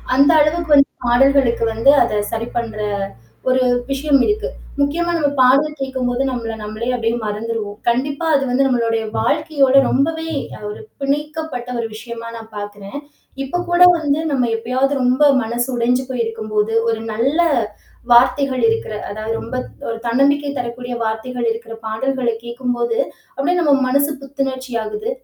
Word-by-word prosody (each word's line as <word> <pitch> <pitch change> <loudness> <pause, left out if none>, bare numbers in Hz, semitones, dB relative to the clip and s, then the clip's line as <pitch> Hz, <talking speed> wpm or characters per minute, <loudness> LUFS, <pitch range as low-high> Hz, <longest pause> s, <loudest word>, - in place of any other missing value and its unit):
அந்த 280 +4 +6
அளவிற்கு 310 +1 +2
வந்து 280 0 +5 0.2
பாடல்களுக்கு 245 -1 +3
வந்து 230 +5 +5
அத 210 -1 0
சரி 230 +1 -3
பண்ற 225 -2 -3 0.7
ஒரு 255 0 +3 0.3
விஷயம் 275 -1 +2
இருக்கு. 430 +2 0 0.3
முக்கியமா 335 +5 +1
நம்ம 290 -3 +1
பாடல் 280 +4 +4
கேட்கும்போது 260 -1 -1
நம்மள 230 -3 -3
நம்மளே 215 +3 -4
அப்பிடியே 230 0 -1
மறந்துருவோம். 210 -1 -4
கண்டிப்பா 280 +6 -1
அது 275 - +2
வந்து 265 +2 +2
நம்மளுடைய 230 -3 +1 0.2
வாழ்க்கையோட 295 -4 +2 0.2
ரொம்பவே 320 +4 0 0.4
ஒரு 210 - -7 0.2
பிணைக்கப்பட்ட 295 -2 -3
ஒரு 230 - -1
விஷயமா 230 0 -8
நான் 225 -1 -11
பாக்குறேன். 205 +3 -7 0.5
இப்போ 275 +6 -3
கூட 350 +1 +2 0.2
வந்து 295 -1 0
நம்ம 255 -3 +2
எப்பயாவது 260 +4 0
ரொம்ப 255 +4 +3 0.2
மனசு 240 +3 -2
உடைஞ்சு 250 +2 +1
போயிருக்கும் 225 -3 -3
போது, 210 +1 +1 0.2
ஒரு 225 -1 -1
நல்ல 270 +9 0 0.7
வார்த்தைகள் 255 +2 +4
இருக்கிற 225 -1 -2 0.2
அதாவது 215 +2 -4
ரொம்ப - - -6 0.3
ஒரு 230 0 -3
தன்னம்பிக்கை 285 +4 +2
தரக்கூடிய 245 +1 -5
வார்த்தைகள் 235 +2 -2
இருக்கிற, 225 0 -6
பாடல்கள 255 +2 -1 0.2
கேட்கும்போது 240 -1 -2 0.4
அப்பிடியே 345 +6 +1
நம் 275 -5 +3
மனசு 280 +3 +2
புத்துணர்ச்சி 270 -2 -4
ஆகுது. 425 - -4
255 Hz, 140 wpm, -19 LUFS, 230-280 Hz, 0.7 s, அந்த